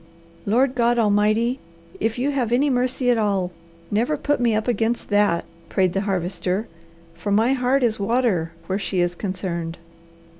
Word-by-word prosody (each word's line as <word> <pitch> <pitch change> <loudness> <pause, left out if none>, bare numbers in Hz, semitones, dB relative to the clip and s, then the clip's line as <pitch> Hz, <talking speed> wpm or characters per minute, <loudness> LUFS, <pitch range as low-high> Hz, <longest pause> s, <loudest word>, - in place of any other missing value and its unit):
Lord 250 +5 +3
God 240 -1 +2
Almighty, 215 +3 +2 0.4
if 225 +2 -1
you 270 +4 0
have 250 -5 -1
any 275 +4 +3
mercy 250 0 +1
at 235 - +2
all, 195 -4 0 0.4
never 235 +9 +1
put 290 0 0
me 235 -3 +2
up 215 +2 -1
against 235 0 0
that," 205 -5 +2 0.2
prayed 185 -2 +1
the 195 - 0
Harvester, 190 +1 -2 0.5
"for 170 +5 -4
my 225 +6 +3
heart 260 +1 +1
is 225 -3 +1
water 200 -6 +1
where 190 +1 -2
she 195 -2 -2
is 175 0 +1
concerned." 175 -3 -4
215 Hz, 160 wpm, -22 LUFS, 190-245 Hz, 0.5 s, Lord